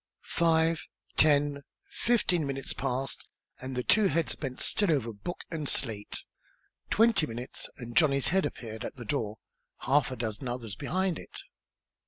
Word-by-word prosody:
Five 165 -1 +2 0.3
ten 145 -1 +4 0.3
fifteen 180 -9 +1
minutes 135 -1 -3
passed 135 0 -3 0.3
and 130 0 -5
the 125 - -1
two 215 - +5
heads 165 -7 0
bent 130 -3 -5
still 205 -5 +3
over 120 -7 0
book 110 - -6
and 155 -4 -2
slate. 105 -5 -1 0.7
Twenty 220 -7 +4
minutes, 120 +2 -6
and 120 -2 -7
Johnny's 140 -4 +4
head 190 +2 +3
appeared 110 -1 -8
at - - -5
the 120 -3 -8
door, 110 -4 -2 0.4
half 135 +2 +3
a 130 - -4
dozen 115 +1 -3
others 120 -4 -4
behind 185 - -1
it. - - -9
140 Hz, 150 wpm, -29 LUFS, 120-165 Hz, 0.7 s, two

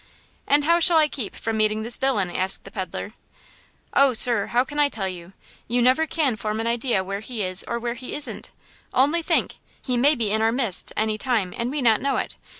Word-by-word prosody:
"And 290 +1 +4
how 335 +3 +3
shall 340 -1 +5
I 310 -1 +5
keep 250 -8 -6
from 225 -1 -3
meeting 215 0 0
this 235 +1 -3
villain?" 250 -9 0
asked 190 +1 +3
the 195 - -12
peddler. 200 +1 -6 0.8
"Oh, 275 -2 +4
sir, 230 -3 +5
how 245 +1 +1
can 290 +2 -7
I 290 -1 +4
tell 200 -7 -3
you? 180 0 -9 0.3
You 240 +2 0
never 255 +6 +3
can 295 -8 0
form 215 +1 -3
an 225 - -3
idea 235 -3 0
where 195 +1 -5
he 220 0 -5
is 185 0 0
or 235 - -2
where 235 0 -3
he 250 +1 -8
isn't! 295 - -3 0.5
Only 295 +6 +3
think, 330 0 0 0.2
he 250 -2 -1
may 285 +5 +4
be 225 -5 -1
in 220 +1 +1
our 225 0 +2
midst 235 -7 0
any 215 0 -1
time, 220 -8 -1
and 235 +1 -3
we 285 0 -3
not 225 -3 +3
know 275 0 0
it! - - -4
235 Hz, 225 wpm, -23 LUFS, 215-270 Hz, 0.8 s, shall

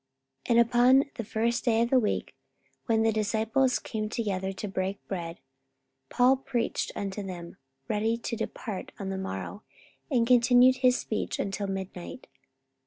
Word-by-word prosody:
44:020:007 - - -13
And 235 0 +5
upon 250 +3 +5
the 230 - -5
first 230 +3 -1
day 230 -2 +3
of 235 - -2
the 260 - +6
week, 215 - -1 0.5
when 225 -2 +3
the 225 - +3
disciples 220 +4 +1
came 215 -2 -4
together 195 -5 -2
to 195 +2 -5
break 190 0 -3
bread, 170 -3 -4 0.7
Paul 255 +2 +4
preached 255 -3 -2
unto 200 +1 -4
them, 175 -3 -8 0.3
ready 220 +2 0
to 230 0 -4
depart 210 -2 -5
on 195 -1 -5
the 190 0 -3
morrow; 190 - -5 0.5
and 245 -5 +2
continued 250 +1 +5
his 255 -1 +4
speech 215 - -3
until 200 +1 -2
midnight. 190 - -6
220 Hz, 155 wpm, -28 LUFS, 195-240 Hz, 0.7 s, the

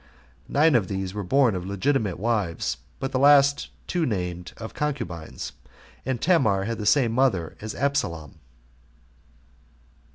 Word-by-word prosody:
Nine 155 +2 +4
of 110 -7 +3
these 95 -1 -3
were 105 - -3
born 125 +4 +3
of 90 -1 -3
legitimate 100 +1 0
wives, 105 -6 -1 0.2
but 135 - -3
the 130 - 0
two - - 0
last 140 0 +5 0.3
named 90 - -2
of 110 - -7
concubines; 90 - -4 0.6
and 130 -3 -1
Tamar 115 - +3
had 115 +2 -3
the 105 - -2
same 125 -2 +4
mother 115 -10 +1
with 110 0 -5
Absalom. 85 - -2
110 Hz, 135 wpm, -25 LUFS, 95-140 Hz, 0.6 s, last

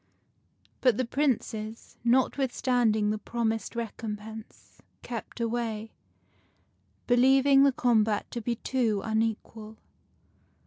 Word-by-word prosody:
But 250 -5 +4
the 255 - 0
Princes, 230 -4 -2
not 250 +2 +3
withstanding 245 -5 +1
the 215 - -2
promised 225 0 -2
recompense, 220 -1 -7 0.2
kept 235 0 -7
away, 225 -2 -2 1.1
believing 270 +3 +5
the 280 0 +6
combat 220 -4 +2
to 235 - -4
be 235 +2 -1
too 225 -5 -1
unequal. 220 0 -2
230 Hz, 95 wpm, -28 LUFS, 220-250 Hz, 1.1 s, the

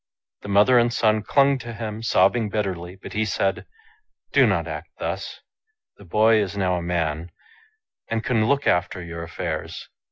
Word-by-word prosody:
The - - -9
mother 105 +5 +5
and 120 0 +2
son 110 -2 +2
clung 140 +4 +3
to 120 -1 -7
him, 110 -1 -5
sobbing 115 -1 +2
bitterly; 95 -4 -3
but 95 - -11
he 110 - +1
said, 95 -1 -1 0.3
" 430 - -48
Do - - +6
not - - 0
act - - -6
thus. - - -5 0.6
The 100 - -15
boy 110 +4 +4
is 100 0 -3
now 95 -2 +1
a - - -3
man, 85 -1 -2 0.8
and 115 -1 -1
can 115 -3 +1
look 140 +1 +1
after 90 +1 +1
your 85 -1 -7
affairs. 85 0 -5
105 Hz, 170 wpm, -23 LUFS, 90-115 Hz, 0.8 s, Do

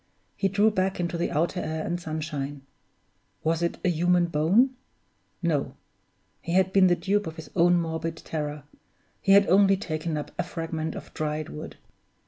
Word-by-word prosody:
He 195 - +1
drew 205 +3 +3
back 190 -2 0
into 175 0 -1
the 170 - -1
outer 170 +5 0
air 160 -1 -3
and 175 +1 -2
sunshine. 150 -4 -4 0.8
Was 165 +1 +1
it 170 - -1
a - - +4
human 175 +1 +3
bone? 170 - +3 0.7
No! - - 0 0.7
he 170 - -4
had 190 0 +3
been 195 -1 +6
the 175 - +4
dupe 205 +2 0
of 160 - -6
his 160 - -10
own 175 0 +5
morbid 165 0 -3
terror 150 -2 -4 0.6
he 195 - +4
had 200 0 +7
only 195 +2 +5
taken 155 -3 -3
up 150 - -5
a - - +2
fragment 165 -2 -4
of - - -9
dried 155 0 -3
wood! 75 - -8
170 Hz, 170 wpm, -26 LUFS, 155-185 Hz, 0.8 s, had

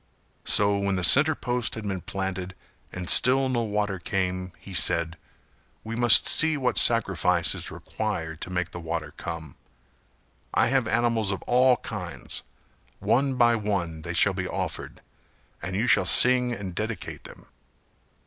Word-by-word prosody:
So 100 0 +2
when 100 -1 -1
the 90 - -3
centre 145 - +6
post 125 -3 -2
had 110 -2 -7
been 95 -2 -4
planted 95 0 -5 0.4
and 90 0 -7
still 130 +5 +4
no 120 -2 -1
water 105 -3 -3
came 90 -4 -3
he 95 - -13
said 85 -1 +2 0.7
"We 115 +1 -6
must 120 -1 +6
see 160 -1 +4
what 130 -3 -1
sacrifice 90 -7 +2
is - - -6
required 80 -8 -6
to - - -7
make 90 -2 -3
the 85 - -8
water 80 -2 -5
come. 80 -4 -8 1.0
I - - +2
have 130 -3 0
animals 115 -2 0
of 95 - -5
all 125 +1 +3
kinds; 90 -6 -4 0.6
one 135 +1 0
by 120 -1 +3
one 95 -7 -3
they 85 +1 -6
shall 100 +3 +3
be 95 0 -4
offered - - -6 0.6
and 90 +4 -5
you 105 +5 -1
shall - - +3
sing 125 -1 +4
and 100 -5 -6
dedicate 110 0 -6
them." - - -13
100 Hz, 155 wpm, -25 LUFS, 90-120 Hz, 1.0 s, centre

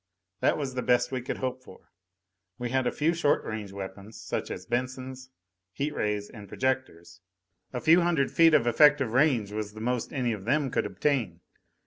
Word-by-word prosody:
That - - +2
was 140 -3 -3
the 125 - -2
best 125 0 +2
we 130 -1 -2
could 125 - -4
hope 130 0 -3
for. 95 - -16 0.7
We 120 -1 -4
had 130 -1 +1
a - - +1
few 160 +3 +1
short 165 -4 +1
range 110 -3 -5
weapons, 100 +2 -8
such - - -4
as - - -6
Bensons, 130 +1 -4 0.4
heat 145 +2 -2
rays 105 -5 -1
and 105 -4 -11
projectors. 90 -9 -3 0.5
A 125 - -3
few 165 +7 +5
hundred 170 -5 +1
feet 165 -1 +6
of 120 - +3
effective 135 0 +4
range 125 -7 +2
was 105 -1 -4
the 110 - -10
most 125 +1 -2
any 125 -4 -1
of 100 -2 -7
them 140 +2 +1
could - - 0
obtain. 120 - -1
125 Hz, 185 wpm, -28 LUFS, 110-140 Hz, 0.7 s, feet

